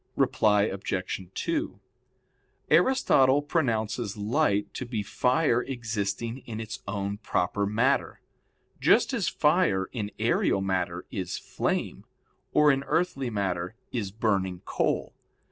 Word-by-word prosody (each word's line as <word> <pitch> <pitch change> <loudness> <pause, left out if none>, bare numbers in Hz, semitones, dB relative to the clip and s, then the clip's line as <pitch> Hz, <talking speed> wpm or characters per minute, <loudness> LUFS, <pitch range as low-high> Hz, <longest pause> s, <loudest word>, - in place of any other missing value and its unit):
Reply 105 -1 +3
Obj. 95 -2 -3
2: - - -2 0.9
Aristotle 145 - +4
pronounces 115 - -1
light 105 -1 +1
to - - -4
be 115 -4 -3
fire 125 +3 +2
existing 115 -2 -3
in 110 -2 -5
its 110 -1 -6
own 100 0 -3
proper 100 -1 0
matter: 120 +7 +1 0.6
just - - +4
as 200 -11 +1
fire 150 - +2
in 105 -5 -3
aerial 115 -2 +2
matter 90 -2 -2
is 95 -2 -3
"flame," - - -2 0.5
or 150 -1 +5
in 135 0 0
earthly 135 -7 0
matter 95 -2 -2 0.2
is 110 -6 -2
"burning 95 -4 -1
coal." - - -1
110 Hz, 115 wpm, -27 LUFS, 100-130 Hz, 0.9 s, or